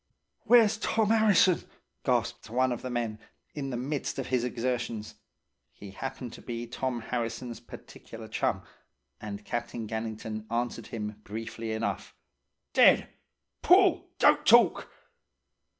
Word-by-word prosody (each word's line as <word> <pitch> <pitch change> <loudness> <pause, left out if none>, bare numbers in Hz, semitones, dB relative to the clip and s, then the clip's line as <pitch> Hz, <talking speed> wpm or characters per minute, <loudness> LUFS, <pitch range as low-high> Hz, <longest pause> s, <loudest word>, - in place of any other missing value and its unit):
"'Where's 225 -3 +6
Tom 220 -2 +1
'Arrison?" 215 -5 +4 0.4
gasped - - -1
one 130 +2 +2
of 120 - -3
the 130 - -5
men, 115 -3 -2 0.3
in 140 -2 -4
the 125 - -3
midst 140 +3 -3
of 135 - -2
his 125 -2 +1
exertions. 120 -3 -3 0.6
He 100 -1 -11
happened 125 +2 -6
to - - -11
be 120 -1 -5
Tom 125 0 -3
Harrison's 115 +1 -4
particular - - -11
chum, - - -1 0.6
and 105 -1 -7
Captain 120 -1 -4
Gannington 110 0 -5
answered 120 +1 -2
him 105 -1 -6
briefly 115 +1 -5
enough: 105 -4 -3 0.6
"'Dead! - - +6 0.5
Pull! - - +5
Don't - - +5
talk!" - - +5
120 Hz, 125 wpm, -29 LUFS, 110-130 Hz, 0.6 s, Where's